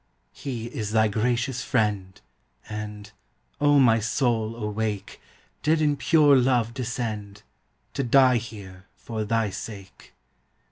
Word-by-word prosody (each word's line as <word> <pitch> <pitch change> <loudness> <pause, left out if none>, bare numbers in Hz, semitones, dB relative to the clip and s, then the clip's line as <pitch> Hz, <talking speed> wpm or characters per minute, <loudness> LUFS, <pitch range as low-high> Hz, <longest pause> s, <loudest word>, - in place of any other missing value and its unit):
He 120 -5 -5
is 110 -3 -5
thy 110 -1 +4
gracious 120 +4 -1
friend, 105 -8 -1 0.5
And 105 -1 -7 0.5
(O 145 0 +4
my 115 -4 +5
soul 115 -1 0
awake!) 105 -2 -4 0.4
Did 155 +1 +2
in 150 -2 +2
pure 150 -1 +4
love 125 -3 +2
descend, 110 -5 -4 0.5
To 140 - -1
die 130 0 +5
here 100 -5 -9
for 110 -2 -5
thy 110 -1 0
sake. 100 -1 -10
115 Hz, 120 wpm, -25 LUFS, 105-125 Hz, 0.5 s, my